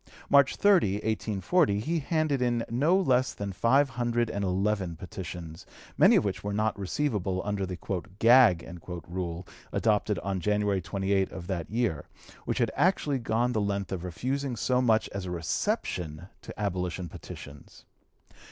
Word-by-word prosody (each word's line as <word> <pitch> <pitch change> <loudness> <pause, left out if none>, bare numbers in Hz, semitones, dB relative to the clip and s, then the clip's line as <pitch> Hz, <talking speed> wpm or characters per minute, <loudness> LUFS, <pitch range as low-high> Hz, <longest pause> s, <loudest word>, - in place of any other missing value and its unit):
March 140 -2 +5
30, 190 - +4
1840, 105 - +1
he 160 +10 -1
handed 155 -2 0
in 120 -2 +1
no 150 +10 +3
less 130 -7 +2
than 100 -1 -4
five 130 +8 +3
hundred 120 -1 0
and 100 - -2
eleven 95 -1 0
petitions, 85 -1 -8 0.3
many - - +6
of - - +3
which - - -3
were 100 - -2
not 110 +1 +1
receivable 100 -3 -1
under 100 -2 -1
the 90 -1 -5 0.4
"gag" 115 -8 +5 0.3
rule 85 0 -4 0.3
adopted 105 -1 +1
on 95 -1 -2
January 105 0 +1
28 95 +2 0
of 90 -2 -7
that 90 -3 -4
year, 110 -9 -1 0.4
which - - -1
had - - +1
actually 150 -7 +2
gone 120 +1 0
the 110 -3 0
length 100 -2 -2
of 90 -3 -3
refusing 130 +9 -2
so 125 +3 +1
much 110 -3 +3
as 100 -1 -5
a - - -5
reception 90 - -2
to - - -9
abolition 90 -3 -2
petitions. 70 -2 -11
105 Hz, 150 wpm, -28 LUFS, 95-125 Hz, 0.4 s, many